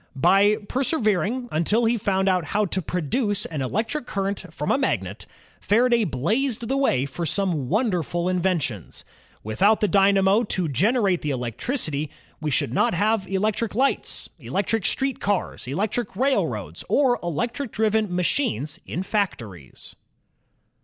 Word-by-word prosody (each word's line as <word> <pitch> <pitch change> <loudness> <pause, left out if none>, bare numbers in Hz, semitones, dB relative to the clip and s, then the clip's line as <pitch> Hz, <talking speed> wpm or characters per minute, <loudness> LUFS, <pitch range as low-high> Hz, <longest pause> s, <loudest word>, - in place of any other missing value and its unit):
By 195 +9 +4
persevering 245 - 0
imtil 210 +9 +2
he 235 - +2
foimd 195 -3 0
out 185 -2 +2
how 210 +4 +1
to 190 0 -2
produce 195 - -1
an 155 -4 -4
electric 225 - -2
current 195 -2 -3
from 150 -2 -2
a - - +3
magnet, 275 - -2 0.3
Faraday 235 +1 +3
blazed 220 - -1
the 265 - 0
way 140 - +2
for 155 +5 -5
some 165 -5 -1
wonderful 180 - 0
inventions. 175 - -2 0.4
Without 195 - +3
the 210 - +2
dynamo 195 +1 +4
to 185 -6 -1
generate 195 - +2
the 150 - -2
electricity, 145 - -2 0.3
we 155 -1 -2
should 130 -4 0
not 175 - +2
have 205 +1 +1
electric 210 +3 -1
lights, 270 +4 0
electric 205 +1 -1
street 270 -1 0
cars, 200 -9 -2
electric 210 - -2
railroads, 270 +1 -1
or 260 -4 +3
electric 225 - -3
driven 220 -2 +1
machines 180 - -1
in 180 - -3
factories. 115 - -4
195 Hz, 135 wpm, -24 LUFS, 165-225 Hz, 0.4 s, By